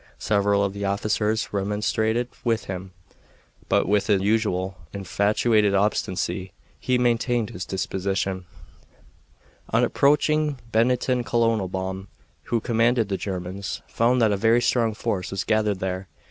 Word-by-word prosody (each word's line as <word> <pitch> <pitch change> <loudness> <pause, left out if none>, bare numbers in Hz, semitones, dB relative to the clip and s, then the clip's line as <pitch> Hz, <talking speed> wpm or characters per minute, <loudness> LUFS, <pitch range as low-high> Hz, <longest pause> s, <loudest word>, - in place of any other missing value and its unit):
Several 100 -1 +2
of 100 -1 -1
the 100 0 -5
officers 105 +2 0
remonstrated 105 +4 0 0.2
with 115 -2 0
him, 95 0 -6 0.8
but - - +2
with 105 +1 +2
his 105 -3 +3
usual 100 -3 0 0.2
infatuated 100 +2 +2
obstinacy 95 -2 -1 0.3
he 125 -1 +1
maintained 120 -2 +1
his 90 - -6
disposition. 95 0 -2 1.2
On - - +2
approaching 150 +1 +2
Bennington 125 +2 +2
Colonel 115 -4 +1
Baum, 95 +1 -4 0.4
who 120 - 0
commanded 115 -1 +1
the 100 - 0
Germans, 95 0 -5
found 120 +2 +2
that 110 - +4
a 100 - +1
very 115 +4 +4
strong 115 -2 +1
force 105 -5 -2
was 95 -1 -2
gathered 105 -2 +1
there. 95 0 -3
105 Hz, 130 wpm, -24 LUFS, 95-115 Hz, 1.2 s, that